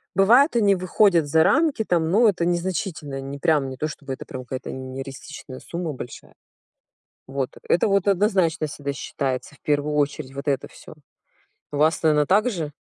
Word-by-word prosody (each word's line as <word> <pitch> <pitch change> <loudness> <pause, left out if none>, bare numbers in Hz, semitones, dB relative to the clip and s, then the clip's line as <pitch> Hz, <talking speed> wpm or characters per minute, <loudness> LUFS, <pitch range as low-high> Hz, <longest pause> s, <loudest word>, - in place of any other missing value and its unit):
бывают, 240 +9 +5
они 205 -4 +4
выходят 185 -2 +3
за 160 +2 +4
рамки 305 -7 +2
там, 165 -4 +1
но 220 +2 +5
это 175 -3 -1
незначительно. 175 -5 -2
Не 140 +1 -7
прям, 150 -5 +2
не 130 - -8
то 155 - -1
чтобы 140 -3 -7
это - - -8
прям 130 0 -7
какая-то 130 0 -6
нереалистичная 130 +1 -8
сумма 170 -3 -5
большая. 120 -2 -10 0.9
Вот. 135 -1 -2 0.2
Это 175 - +3
вот 200 0 +2
однозначно 185 -5 +2
всегда 140 -1 -5
считается 135 +1 -4
в - - -23
первую 150 0 0
очередь- 145 -2 -1
вот 140 +2 -5
это 140 - 0
всё. - - -14 0.8
У 145 - -3
вас, 155 +3 +2
наверно, 150 -2 +4
так 210 - +3
же? 160 -8 -4
155 Hz, 175 wpm, -23 LUFS, 140-190 Hz, 0.9 s, бывают